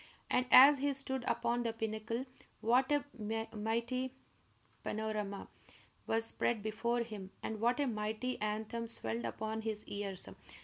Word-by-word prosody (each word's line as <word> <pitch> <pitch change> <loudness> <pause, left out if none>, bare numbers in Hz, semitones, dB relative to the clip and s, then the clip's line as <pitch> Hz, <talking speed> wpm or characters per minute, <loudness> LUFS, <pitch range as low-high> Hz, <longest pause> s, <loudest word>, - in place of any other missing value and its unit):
And 250 0 +3
as 275 +2 +10
he 285 +1 +2
stood 265 -1 -2
upon 240 +1 +1
the 230 -1 -1
pinnacle, 225 +2 -2 0.4
what 255 +4 +3
a 290 -1 +3 0.5
mighty 235 +4 -1 0.7
panorama 210 -2 -3 0.6
was 225 0 +3
spread 225 -1 0
before 235 +3 0
him, 210 -5 -7
and 220 -1 -3
what 240 +4 +3
a 290 - +3
mighty 220 +1 -2
anthem 220 +2 -2
swelled 115 - -1
upon 220 - -3
his 215 -1 -3
ears! 200 -2 -4
225 Hz, 135 wpm, -35 LUFS, 215-250 Hz, 0.7 s, as